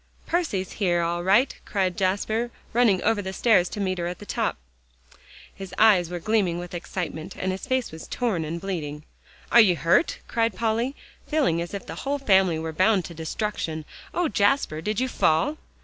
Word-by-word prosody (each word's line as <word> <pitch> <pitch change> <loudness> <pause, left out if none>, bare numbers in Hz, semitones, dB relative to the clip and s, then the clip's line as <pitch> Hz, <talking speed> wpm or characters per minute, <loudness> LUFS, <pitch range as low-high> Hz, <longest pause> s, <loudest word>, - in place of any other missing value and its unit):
"Percy's 300 - -1
here 175 -3 +2
all 170 +1 -1
right!" 210 +9 +3
cried 190 -3 -1
Jasper, 210 +5 0 0.2
running 225 -6 +3
over 225 -2 +2
the 190 -1 -4
stairs 190 -4 +3
to - - -6
meet 185 -2 -1
her 170 - -1
at 180 - -4
the 205 - -11
top. - - -1 1.0
His 190 -1 -9
eyes 195 -6 +5
were 175 - -4
gleaming 190 -2 +1
with 175 0 -7
excitement, 175 -2 -5
and 185 - -1
his 190 +7 -5
face 260 -2 0
was 160 0 -9
torn 220 -10 -1
and 165 +2 -4
bleeding. 155 -6 -4 0.5
"Are 235 - +9
you 190 -5 +4
hurt?" 165 - +2
cried 230 -3 0
Polly, 230 +6 0 0.3
feeling 275 - +1
as 175 +4 -5
if 200 - -6
the - - -7
whole 280 +1 -1
family 190 - +3
were 160 0 -4
bound 185 +2 +3
to 170 - -8
destruction. 160 -1 -3 0.3
"Oh, 350 -1 0
Jasper! 205 - +1
did 210 +5 -1
you 260 - +1
fall?" 170 - +1
190 Hz, 185 wpm, -25 LUFS, 170-225 Hz, 1.0 s, Are